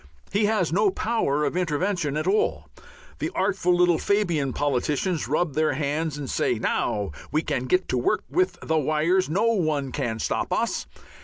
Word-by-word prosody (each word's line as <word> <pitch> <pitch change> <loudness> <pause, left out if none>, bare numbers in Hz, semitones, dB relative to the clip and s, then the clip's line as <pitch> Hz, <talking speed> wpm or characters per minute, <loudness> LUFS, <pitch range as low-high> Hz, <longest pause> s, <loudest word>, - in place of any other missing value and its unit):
He 205 +2 +2
has 205 -7 +1
no 205 +2 +4
power 185 -9 0
of - - -2
intervention 175 -2 0
at 155 - -1
all. 80 - +1 0.5
The - - -1
artful 180 0 +2
little 175 -2 +4
Fabian 175 -10 +1
politicians 145 +5 -1
rub 155 +2 0
their 155 0 +1
hands 150 +2 -2
and 145 -2 -5
say, 125 - 0
"Now 105 -3 -1 0.2
we 155 +1 +1
can 130 - -2
get 180 +8 +1
to 125 - +1
work 120 - +1
with 180 +6 0
the 160 0 +1
wires! 155 +5 +1
No 215 +8 +2
one 155 - 0
can 115 -2 -2
stop - - -2
us." - - -1
155 Hz, 170 wpm, -25 LUFS, 140-185 Hz, 0.5 s, no